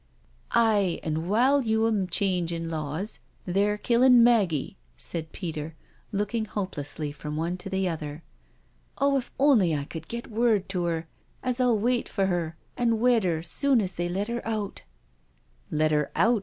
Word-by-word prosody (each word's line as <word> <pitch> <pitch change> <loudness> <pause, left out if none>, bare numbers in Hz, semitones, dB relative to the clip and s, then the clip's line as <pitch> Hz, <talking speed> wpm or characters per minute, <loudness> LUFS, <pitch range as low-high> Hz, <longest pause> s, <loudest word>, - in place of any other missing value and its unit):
" - - -31
Aye, 210 -6 +3
an* 160 +1 -2
while 260 +7 +4
you'm 220 -4 +1
changin' 170 -3 0
laws, 155 +6 -2 0.3
they're 200 +3 +1
killin' 240 +2 +5
Maggie," 200 - +2 0.2
said 160 - -2
Peter, 160 -3 -5 0.4
looking 210 +2 -1
hopelessly 155 -8 -4
from 150 +1 -6
one 165 +3 -1
to 195 - -6
the 190 -1 0
other: 155 -2 -5 0.4
" - - -38
oh, 280 +1 +2
if 260 -3 -2
only 230 - +4
I 140 -1 -2
cud 160 +1 -8
get 235 0 -6
word 220 -3 +2
to 180 -3 -1
'er 165 -1 -2 0.4
as 255 0 0
I'll 245 -3 +3
wait 240 +3 0
for 195 -2 0
'er 175 -3 -1 0.2
an' 230 -3 +1
wed 240 -3 +3
'er 165 -2 0
sune 265 - +2
as 190 -3 -1
they 175 0 -2
let 195 +4 -2
'er 235 0 -3
out 215 -3 -3 0.9
I" - - -3
"Let 155 +1 +2
her 150 -1 +1
out?" 225 +6 +3
195 Hz, 170 wpm, -27 LUFS, 165-230 Hz, 0.9 s, killin